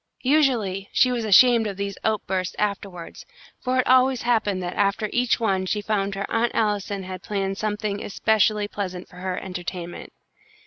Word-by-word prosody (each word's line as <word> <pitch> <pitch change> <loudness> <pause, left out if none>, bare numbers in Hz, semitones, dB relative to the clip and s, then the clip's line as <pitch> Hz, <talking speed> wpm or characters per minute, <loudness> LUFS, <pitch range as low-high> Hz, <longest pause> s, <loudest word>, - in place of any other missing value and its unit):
Usually 245 -9 +1
she 255 - +4
was 240 -2 -1
ashamed 225 +2 +6
of 200 -2 -5
these 200 -1 -3
outbursts 190 -4 -1
afterwards, 200 -4 -4 0.4
for 255 0 -1
it 255 - +2
always 255 0 +4
happened 215 -6 +1
that 175 0 -4
after 200 +1 0
each 245 0 +2
one 190 -4 0
she 210 - 0
found 200 -2 -1
her 200 0 -3
Aunt 230 +1 0
Allison 205 -2 -1
had 185 0 -7
planned 195 -1 -3
something 210 -1 -2
especially 210 0 +1
pleasant 185 -3 -5
for 180 - -16
her 185 0 -3
entertainment. 180 -1 -6
205 Hz, 165 wpm, -24 LUFS, 190-225 Hz, 0.4 s, ashamed